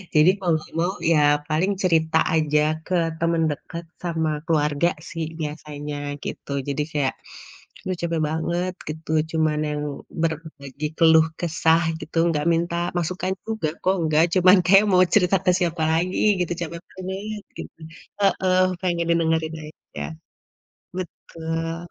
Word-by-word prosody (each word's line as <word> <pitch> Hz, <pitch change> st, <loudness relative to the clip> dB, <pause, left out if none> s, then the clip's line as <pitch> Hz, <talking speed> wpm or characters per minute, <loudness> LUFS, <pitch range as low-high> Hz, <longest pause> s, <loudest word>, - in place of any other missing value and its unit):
Jadi 155 Hz, +3 st, +7 dB
kalau 170 Hz, -4 st, +1 dB, 0.2 s
mau 175 Hz, +3 st, +1 dB, 0.2 s
ya 155 Hz, -, +5 dB, 0.3 s
paling 170 Hz, +6 st, +1 dB
cerita 160 Hz, -2 st, +3 dB, 0.2 s
aja 150 Hz, -1 st, +2 dB, 0.3 s
ke 185 Hz, -, -1 dB, 0.2 s
temen 165 Hz, 0 st, +1 dB
deket 170 Hz, +4 st, -7 dB, 0.2 s
sama 160 Hz, -2 st, 0 dB, 0.2 s
keluarga 150 Hz, 0 st, +2 dB, 0.2 s
sih 165 Hz, -1 st, -3 dB
biasanya 150 Hz, -1 st, -5 dB, 0.3 s
gitu. -, -, -6 dB, 0.2 s
Jadi 140 Hz, +1 st, -1 dB
kayak, 145 Hz, -3 st, 0 dB, 0.7 s
“Duh, 185 Hz, -2 st, -2 dB
capek 165 Hz, -2 st, -1 dB
banget, 170 Hz, +3 st, -1 dB, 0.2 s
gitu,” 155 Hz, +1 st, -6 dB, 0.2 s
cuma 160 Hz, -1 st, +2 dB, 0.2 s
yang 150 Hz, 0 st, -2 dB, 0.4 s
berbagi 155 Hz, -3 st, -3 dB
keluh 160 Hz, -1 st, +6 dB
kesah 165 Hz, 0 st, +2 dB, 0.2 s
gitu, 165 Hz, -, -7 dB
nggak 150 Hz, -2 st, -1 dB
minta 170 Hz, +1 st, 0 dB, 0.2 s
masukan 185 Hz, +2 st, -1 dB
juga 220 Hz, -9 st, -2 dB
kok 190 Hz, +1 st, +3 dB
nggak 155 Hz, +1 st, +4 dB
cuman 185 Hz, +2 st, +7 dB
kayak 195 Hz, +3 st, +6 dB
mau 185 Hz, -1 st, +6 dB
cerita 195 Hz, -2 st, +4 dB
ke -, -, +4 dB
siapa 170 Hz, -2 st, -1 dB
lagi 175 Hz, +3 st, 0 dB, 0.2 s
gitu 175 Hz, -1 st, 0 dB
capek 170 Hz, 0 st, -4 dB, 0.2 s
banget 195 Hz, +3 st, -5 dB, 0.2 s
gitu, -, -, -9 dB, 0.4 s
heeh, 185 Hz, -2 st, +3 dB, 0.2 s
pengen 170 Hz, -2 st, 0 dB
didengerin 160 Hz, -1 st, +1 dB
aja, 155 Hz, -, -9 dB, 0.9 s
betul. 165 Hz, -1 st, -5 dB
165 Hz, 135 wpm, -23 LUFS, 155-180 Hz, 0.9 s, Jadi